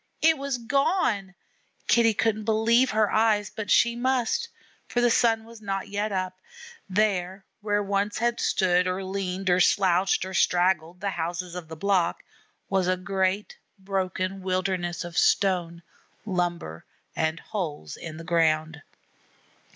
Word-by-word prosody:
It 320 Hz, 0 st, +6 dB
was 275 Hz, -2 st, -2 dB
gone! 235 Hz, -, 0 dB, 0.5 s
Kitty 230 Hz, -2 st, +4 dB
couldn't 215 Hz, -1 st, 0 dB
believe 230 Hz, +3 st, +3 dB
her 215 Hz, -2 st, +2 dB
eyes; 215 Hz, -2 st, +2 dB
but 215 Hz, -3 st, -5 dB
she 235 Hz, 0 st, +4 dB
must, 250 Hz, -1 st, 0 dB, 0.4 s
for 245 Hz, -, -1 dB
the 240 Hz, -1 st, +3 dB
sun 225 Hz, -1 st, +3 dB
was 230 Hz, 0 st, -14 dB
not 195 Hz, 0 st, -3 dB
yet 205 Hz, +1 st, -2 dB
up. 185 Hz, -1 st, -3 dB, 0.5 s
There 190 Hz, -1 st, 0 dB, 0.2 s
where 205 Hz, 0 st, 0 dB
once 200 Hz, +1 st, -1 dB
had 235 Hz, +1 st, 0 dB
stood 180 Hz, -1 st, +2 dB
or 185 Hz, +1 st, -2 dB
leaned 190 Hz, 0 st, -4 dB
or 180 Hz, -, +4 dB
slouched 185 Hz, 0 st, +3 dB
or 190 Hz, -, -7 dB
straggled 180 Hz, -1 st, +1 dB
the 200 Hz, -1 st, -1 dB
houses 175 Hz, +1 st, -4 dB
of 180 Hz, -2 st, -7 dB
the 160 Hz, -, -8 dB
block, 180 Hz, 0 st, 0 dB, 0.4 s
was 190 Hz, -2 st, +1 dB
a 185 Hz, 0 st, +2 dB
great 190 Hz, +2 st, -1 dB, 0.2 s
broken 190 Hz, 0 st, -3 dB
wilderness 185 Hz, -2 st, -1 dB
of 175 Hz, -1 st, -2 dB
stone, 175 Hz, -3 st, +1 dB, 0.4 s
lumber, 175 Hz, -, -2 dB, 0.3 s
and 160 Hz, +1 st, -1 dB
holes 155 Hz, -, -5 dB
in 155 Hz, -2 st, -8 dB
the 165 Hz, -, -8 dB
ground. 160 Hz, -2 st, +1 dB
190 Hz, 145 wpm, -26 LUFS, 180-215 Hz, 0.5 s, It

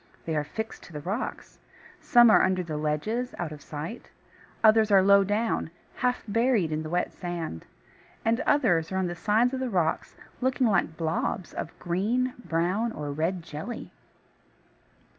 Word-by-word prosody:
They 160 Hz, -, -2 dB
are 150 Hz, -, +1 dB
fixed 220 Hz, +9 st, -6 dB
to 175 Hz, -, -14 dB
the 150 Hz, -, -5 dB
rocks. 200 Hz, -, -5 dB, 0.4 s
Some 240 Hz, -2 st, +6 dB
are -, -, +6 dB
under 185 Hz, -1 st, +2 dB
the 160 Hz, -3 st, -5 dB
ledges, 155 Hz, +12 st, -2 dB
out 170 Hz, -3 st, -3 dB
of 150 Hz, -1 st, -9 dB
sight, 155 Hz, +12 st, -7 dB, 0.5 s
others 220 Hz, 0 st, +6 dB
are 195 Hz, -2 st, +6 dB
low 200 Hz, 0 st, +6 dB
down, 210 Hz, -1 st, 0 dB, 0.3 s
half 250 Hz, 0 st, 0 dB
buried 225 Hz, -5 st, +2 dB
in 155 Hz, 0 st, -1 dB
the 155 Hz, -, -6 dB
wet 175 Hz, +2 st, -1 dB
sand; 170 Hz, -, -5 dB, 0.6 s
and 230 Hz, +1 st, +2 dB
others 185 Hz, -, +3 dB
are 190 Hz, -, -1 dB
on 190 Hz, -, +1 dB
the 175 Hz, -, -2 dB
sides 220 Hz, +7 st, +2 dB
of 260 Hz, -, -2 dB
the 260 Hz, -1 st, -2 dB
rocks, 175 Hz, -6 st, -1 dB, 0.3 s
looking 260 Hz, 0 st, +2 dB
like 190 Hz, -7 st, +1 dB
blobs 165 Hz, +2 st, -2 dB
of 160 Hz, -, -6 dB
green, 225 Hz, +9 st, 0 dB
brown, 180 Hz, +7 st, 0 dB
or 145 Hz, -1 st, -4 dB
red 165 Hz, +4 st, -1 dB
jelly. 160 Hz, +11 st, -7 dB
190 Hz, 165 wpm, -27 LUFS, 160-230 Hz, 0.6 s, Some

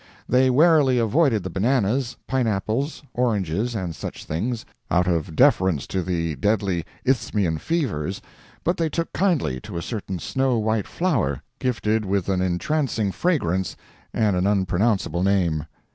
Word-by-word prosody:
They 130 Hz, +1 st, +4 dB
warily 145 Hz, -1 st, +5 dB
avoided 115 Hz, -, +2 dB
the 95 Hz, -, -5 dB
bananas, 120 Hz, +3 st, +1 dB
pineapples, 125 Hz, +3 st, -1 dB
oranges, 110 Hz, -2 st, 0 dB
and 90 Hz, -6 st, -3 dB
such -, -, -7 dB
things, 110 Hz, +9 st, -2 dB, 0.2 s
out 90 Hz, +1 st, +3 dB
of 85 Hz, -2 st, -1 dB
deference 95 Hz, -, +3 dB
to 95 Hz, -, -2 dB
the 85 Hz, -3 st, -1 dB
deadly 100 Hz, -1 st, 0 dB, 0.2 s
Isthmian 105 Hz, -10 st, +1 dB
fevers, 100 Hz, -, -1 dB, 0.4 s
but 175 Hz, +2 st, +1 dB
they 165 Hz, -1 st, 0 dB
took 165 Hz, +1 st, -3 dB
kindly 170 Hz, -, +1 dB
to -, -, -7 dB
a 85 Hz, -, -3 dB
certain 100 Hz, -5 st, -4 dB
snow 130 Hz, +7 st, 0 dB
white 110 Hz, -1 st, 0 dB
flower, 120 Hz, -, 0 dB, 0.2 s
gifted 110 Hz, -3 st, 0 dB
with 100 Hz, -1 st, -1 dB
an 95 Hz, -1 st, +1 dB
entrancing 105 Hz, -, 0 dB
fragrance 95 Hz, -, 0 dB, 0.4 s
and 105 Hz, -4 st, +1 dB
an 90 Hz, +2 st, +1 dB
unpronounceable 95 Hz, -1 st, +1 dB
name. 90 Hz, -5 st, +1 dB
105 Hz, 140 wpm, -23 LUFS, 90-130 Hz, 0.4 s, warily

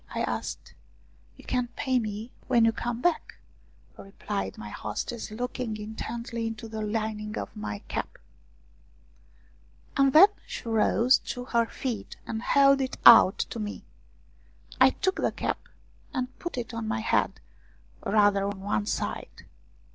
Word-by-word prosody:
" -, -, -10 dB
I -, -, -1 dB
asked. -, -, -4 dB, 0.3 s
" -, -, -32 dB
You -, -, -14 dB
can 250 Hz, -1 st, 0 dB
pay 260 Hz, -1 st, +1 dB
me 215 Hz, +1 st, -5 dB, 0.2 s
when 235 Hz, -3 st, +4 dB
you 225 Hz, -, +4 dB
come 240 Hz, +1 st, -4 dB
back," 350 Hz, -2 st, 0 dB, 0.6 s
replied 100 Hz, -, -5 dB
my 105 Hz, -1 st, -7 dB
hostess, 160 Hz, -, -5 dB
looking 245 Hz, 0 st, -4 dB
intently 225 Hz, +2 st, -5 dB
into 225 Hz, 0 st, -6 dB
the 220 Hz, 0 st, -5 dB
lining 215 Hz, 0 st, -3 dB
of 100 Hz, -, -5 dB
my 105 Hz, -1 st, -5 dB
cap. -, -, -4 dB, 1.8 s
And 275 Hz, -1 st, +4 dB
then 345 Hz, +9 st, +9 dB, 0.2 s
she -, -, -7 dB
rose 230 Hz, +3 st, +4 dB
to 245 Hz, -1 st, -6 dB
her 235 Hz, -2 st, +1 dB
feet 240 Hz, -4 st, -5 dB
and 220 Hz, -, -4 dB
held 275 Hz, +2 st, +5 dB
it 260 Hz, -, -3 dB
out 225 Hz, -4 st, +9 dB, 0.2 s
to 230 Hz, -, -5 dB
me. 210 Hz, -1 st, -5 dB, 1.0 s
I -, -, +8 dB
took 380 Hz, 0 st, -1 dB
the -, -, +1 dB
cap, -, -, -2 dB, 0.6 s
and 255 Hz, -1 st, -3 dB
put 345 Hz, -6 st, -5 dB
it 240 Hz, -1 st, -4 dB
on 230 Hz, -1 st, -4 dB
my 220 Hz, 0 st, -1 dB
head, 225 Hz, -, +1 dB, 0.6 s
rather 205 Hz, -2 st, +3 dB
on 200 Hz, -1 st, -3 dB
one 110 Hz, -, -1 dB
side. -, -, -4 dB
225 Hz, 150 wpm, -27 LUFS, 210-245 Hz, 1.8 s, then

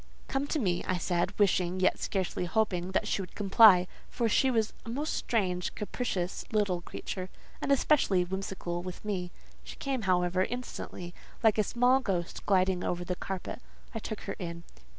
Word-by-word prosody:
"Come 270 Hz, +1 st, -1 dB
to 315 Hz, -, 0 dB
me," 180 Hz, -10 st, 0 dB
I 185 Hz, -, +1 dB
said, 175 Hz, 0 st, -1 dB
wishing, 185 Hz, -3 st, +2 dB
yet 185 Hz, -, +3 dB
scarcely 190 Hz, -2 st, -1 dB
hoping, 185 Hz, -2 st, 0 dB
that -, -, +1 dB
she -, -, 0 dB
would 180 Hz, -, -9 dB
comply: 200 Hz, -2 st, +7 dB, 0.2 s
for 235 Hz, -, 0 dB
she 260 Hz, +4 st, +3 dB
was 225 Hz, -4 st, +1 dB
a -, -, -8 dB
most 290 Hz, +7 st, -2 dB
strange, 185 Hz, -6 st, -1 dB
capricious, 200 Hz, -4 st, -3 dB
little 200 Hz, -5 st, +1 dB
creature, 185 Hz, +1 st, -6 dB, 0.3 s
and -, -, 0 dB
especially 250 Hz, -10 st, +3 dB
whimsical 185 Hz, -2 st, -4 dB
with 180 Hz, +3 st, -8 dB
me. 185 Hz, -4 st, -2 dB, 0.3 s
She -, -, -9 dB
came, 270 Hz, -3 st, -2 dB
however, 180 Hz, 0 st, +3 dB
instantly, 215 Hz, -7 st, -6 dB, 0.3 s
like 220 Hz, -1 st, +4 dB
a -, -, +5 dB
small 245 Hz, +5 st, +3 dB
ghost 180 Hz, -8 st, -2 dB
gliding 185 Hz, -2 st, +3 dB
over 175 Hz, 0 st, -2 dB
the 180 Hz, -, -2 dB
carpet. 190 Hz, +6 st, -5 dB, 0.3 s
I 225 Hz, -, -3 dB
took 215 Hz, 0 st, -6 dB
her 200 Hz, -, -4 dB
in. 170 Hz, -2 st, -5 dB
190 Hz, 170 wpm, -30 LUFS, 180-225 Hz, 0.3 s, comply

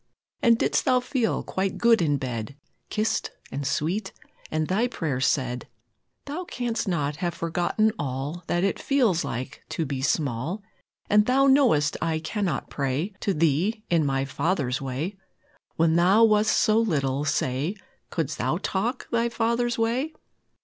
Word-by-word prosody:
And 235 Hz, -2 st, +5 dB
didst -, -, +1 dB
Thou 255 Hz, -1 st, +4 dB
feel 250 Hz, -2 st, -1 dB
quite 190 Hz, 0 st, -2 dB
good 235 Hz, -3 st, +4 dB
in 145 Hz, -3 st, +2 dB
bed, 125 Hz, -1 st, -4 dB, 0.3 s
Kissed, 215 Hz, +1 st, 0 dB, 0.2 s
and 140 Hz, 0 st, -3 dB
sweet, 185 Hz, +8 st, -1 dB, 0.4 s
and 155 Hz, 0 st, -1 dB
Thy 215 Hz, +6 st, +2 dB
prayers 145 Hz, -, -1 dB
said? 125 Hz, -3 st, -1 dB, 0.6 s
Thou 300 Hz, +6 st, -4 dB
canst 240 Hz, -7 st, -2 dB
not 150 Hz, -5 st, -1 dB
have 175 Hz, 0 st, -2 dB
forgotten 175 Hz, +6 st, +1 dB
all 140 Hz, +5 st, -3 dB
That 175 Hz, +1 st, +1 dB
it 195 Hz, -, 0 dB
feels 240 Hz, -, +2 dB
like 130 Hz, +4 st, -5 dB
to 165 Hz, -, -2 dB
be 135 Hz, -2 st, -3 dB
small: 145 Hz, -, -1 dB, 0.4 s
And 210 Hz, 0 st, +4 dB
Thou 270 Hz, +2 st, +4 dB
know'st 250 Hz, -, +4 dB
I 165 Hz, -1 st, 0 dB
cannot 180 Hz, +3 st, -2 dB
pray 140 Hz, +8 st, -1 dB
To 200 Hz, -, 0 dB
Thee 170 Hz, +7 st, +1 dB
in 165 Hz, -2 st, +4 dB
my 135 Hz, -1 st, 0 dB
father's 140 Hz, -3 st, -1 dB
way 140 Hz, +9 st, -3 dB, 0.6 s
When 160 Hz, 0 st, +3 dB
Thou 190 Hz, +6 st, +5 dB
wast 215 Hz, -1 st, +4 dB
so 215 Hz, 0 st, +4 dB
little, 140 Hz, -10 st, 0 dB
say, 145 Hz, +4 st, 0 dB, 0.3 s
Couldst 160 Hz, -5 st, -3 dB
Thou 160 Hz, -, +1 dB
talk 200 Hz, +6 st, -2 dB
Thy 235 Hz, 0 st, +2 dB
Father's 235 Hz, +1 st, 0 dB
way? 245 Hz, +7 st, 0 dB
175 Hz, 150 wpm, -26 LUFS, 145-225 Hz, 0.6 s, And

